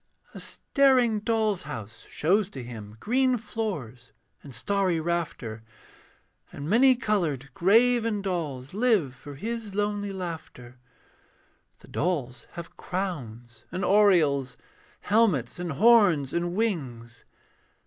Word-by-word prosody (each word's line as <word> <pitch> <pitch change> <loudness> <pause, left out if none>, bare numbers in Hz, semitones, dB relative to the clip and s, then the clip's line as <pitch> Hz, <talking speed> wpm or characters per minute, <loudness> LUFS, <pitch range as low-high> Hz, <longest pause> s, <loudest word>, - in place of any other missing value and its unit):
A - - -8
staring 255 -6 +2
doll's 215 -3 0
house 115 -7 -8
shows 195 +5 +1
to 135 -9 -8
him 110 -3 -9
Green 255 - +2
floors 170 - -5 0.3
and 140 - -11
starry 185 - 0
rafter, 160 -9 -3 0.9
And 145 - -7
many 255 +7 +5
coloured 160 - -1
graven 225 - +3
dolls 150 -8 -3
Live 210 - +2
for 140 +2 -11
his 220 +4 -5
lonely 205 -1 -1
laughter. 160 -9 -7 1.0
The - - -16
dolls 145 -8 -2
have 170 -1 -9
crowns 120 - -5
and 185 +2 -3
aureoles, 160 -11 +3 0.4
Helmets 195 - +2
and 175 -3 -3
horns 190 - +4
and 175 +1 -1
wings. 130 - -3
175 Hz, 110 wpm, -27 LUFS, 135-210 Hz, 1.0 s, many